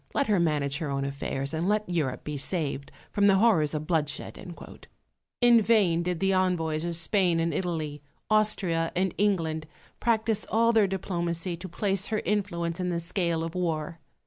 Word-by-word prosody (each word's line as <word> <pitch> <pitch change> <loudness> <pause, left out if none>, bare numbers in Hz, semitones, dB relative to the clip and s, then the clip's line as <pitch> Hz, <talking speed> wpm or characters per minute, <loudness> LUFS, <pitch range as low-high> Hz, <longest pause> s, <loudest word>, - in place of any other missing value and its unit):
Let 280 - +2
her 210 -5 +2
manage 150 -3 +1
her 155 -4 -3
own 135 0 -1
affairs, 140 0 -3
and 165 +4 -1
let 210 0 +1
Europe 160 -8 -2
be 150 - -5
saved 145 -2 -1 0.2
from 205 0 +3
the 195 - +5
horrors 190 -9 +3
of 150 0 -3
bloodshed." 155 -3 -2 1.1
In 240 -1 +6
vain 200 -7 +3
did 175 -1 -2
the 195 0 +2
envoys 165 -4 0
of 170 0 -2
Spain 175 0 +2
and 165 0 0
Italy, 155 -5 -3 0.3
Austria 195 -6 +1
and 185 0 0
England, 165 -6 0 0.3
practise 220 -2 0
all 230 +1 +3
their 215 -3 +4
diplomacy 175 -2 -2
to 185 +3 -9
place 195 +2 0
her 215 -1 -2
influence 175 -5 -1
in 180 0 -1
the 170 -1 -1
scale 170 -1 -1
of 165 0 -5
war. 165 -2 -2
170 Hz, 170 wpm, -27 LUFS, 160-200 Hz, 1.1 s, In